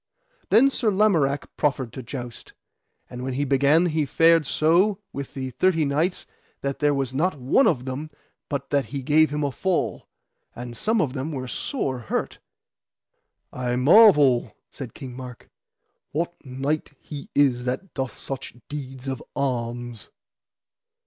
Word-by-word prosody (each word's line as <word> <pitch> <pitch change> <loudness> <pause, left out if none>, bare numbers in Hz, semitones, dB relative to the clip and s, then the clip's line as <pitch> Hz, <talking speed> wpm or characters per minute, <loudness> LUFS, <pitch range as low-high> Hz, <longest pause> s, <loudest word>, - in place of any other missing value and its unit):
Then 270 +4 +6
Sir 235 -4 +1
Lamorak 175 -9 +1
proffered 135 -5 0
to 130 - -6
joust. 120 -1 -8 0.5
And 125 - -8
when 130 0 -3
he 140 +3 0
began 140 +5 +4
he 155 -3 0
fared 165 0 +4
so 175 +8 +3 0.2
with 140 -1 -6
the 130 -1 -4
thirty 160 +5 +2
knights 155 +6 0 0.4
that 140 0 -3
there 145 -1 +2
was 135 -2 -2
not 160 +4 0
one 135 - +3
of 130 -7 +1
them 135 +4 -5 0.4
but 140 -1 -4
that 140 -1 +2
he 140 -2 -5
gave 155 +2 +4
him 150 +1 -2
a 140 - 0
fall, 185 +6 -1 0.5
and 120 0 -7
some 220 - +1
of 135 -6 -1
them 140 +3 -3
were 130 -3 -4
sore 130 - -2
hurt. 110 - -3 1.1
I 125 -1 -2
marvel, 145 - +6
said 130 -5 -8
King 130 -4 -8
Mark, 125 -2 -10 0.6
what 170 +3 -1
knight 140 +3 -3
he 145 -2 -9
is 125 -4 +3
that 130 +9 -3
doth 130 -2 -4
such 135 -2 -6
deeds 135 -2 -7
of 130 -2 -3
arms. 120 -3 -3
140 Hz, 150 wpm, -24 LUFS, 130-155 Hz, 1.1 s, Then